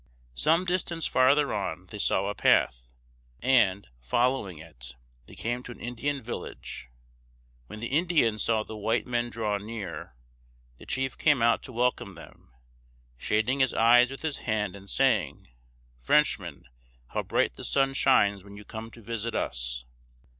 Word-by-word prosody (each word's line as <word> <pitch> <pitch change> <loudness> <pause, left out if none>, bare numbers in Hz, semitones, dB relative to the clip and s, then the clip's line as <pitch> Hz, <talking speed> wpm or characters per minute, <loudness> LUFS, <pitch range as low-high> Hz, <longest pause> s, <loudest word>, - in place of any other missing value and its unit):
Some 165 - +2
distance 175 -3 -1
farther 140 +3 +3
on 95 -3 -3
they 105 - -7
saw 95 -1 +2
a 100 - -1
path, - - +2 0.5
and, 115 -7 +3
following 105 - 0
it, 65 -6 -9 0.3
they - - -13
came 120 +2 -2
to 125 - -9
an - - -11
Indian 130 +3 -3
village. 110 - -7 0.8
When 110 - -9
the - - -3
Indians 145 -8 +2
saw 110 -2 +2
the 110 - -9
white 110 +3 0
men 120 -1 -1
draw 105 -3 -2
near, 100 - -7 0.6
the - - -13
chief 130 -1 -1
came 145 -6 +3
out 115 0 +4
to - - -9
welcome 120 -5 -1
them, 85 - -15 0.7
shading 110 - +1
his 130 -2 +2
eyes 120 +2 +6
with 135 +3 -8
his 155 -3 -2
hand, 105 -4 -2
and 100 0 -10
saying: - - +1 0.5
"Frenchmen, 60 - +1 0.5
how - - -1
bright - - +1
the - - -10
sun 135 -1 +1
shines 100 -8 +3
when 100 0 -12
you 105 - -11
come 110 +1 -7
to 115 0 -15
visit 115 +1 -4
us!" - - -3
115 Hz, 155 wpm, -28 LUFS, 100-130 Hz, 0.8 s, eyes